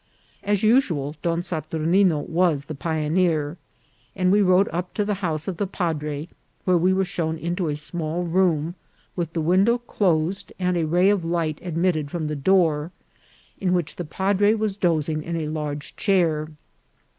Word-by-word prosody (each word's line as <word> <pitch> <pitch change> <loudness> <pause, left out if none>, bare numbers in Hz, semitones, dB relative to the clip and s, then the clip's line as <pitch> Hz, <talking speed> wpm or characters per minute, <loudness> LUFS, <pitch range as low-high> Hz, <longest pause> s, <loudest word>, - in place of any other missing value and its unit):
As 205 0 0
usual, 175 - +2
Don 170 0 0
Saturnino 160 +1 +1
was 165 -4 +1
the 155 - -6
pioneer, 155 +1 0 0.6
and 185 -1 +2
we 205 +1 +5
rode 185 0 +4
up 180 +2 -4
to 210 - 0
the 210 - 0
house 160 -4 -2
of 185 -3 -3
the 200 - -1
padre, 155 -5 -3 0.4
where 185 - +3
we 175 +2 +3
were 190 0 +2
shown 160 -2 -2
into 175 +2 -2
a 150 - -1
small 160 +2 -3
room, 170 -2 +1 0.4
with 170 -3 -3
the 165 - -1
window 190 +9 +3
closed 195 -5 -1
and 180 -1 0
a 165 -2 0
ray 180 +5 +4
of 200 -4 0
light 165 -2 -1
admitted 165 -3 0
from 165 0 -3
the 150 0 -2
door, 160 -1 +2 0.7
in 185 -2 +1
which 175 -4 -1
the 175 - -3
padre 200 +5 +2
was 215 -3 -1
dozing 160 -5 0
in 170 +2 -4
a 155 -2 -2
large 150 -2 -4
chair. 165 -6 +1
170 Hz, 170 wpm, -23 LUFS, 155-185 Hz, 0.7 s, we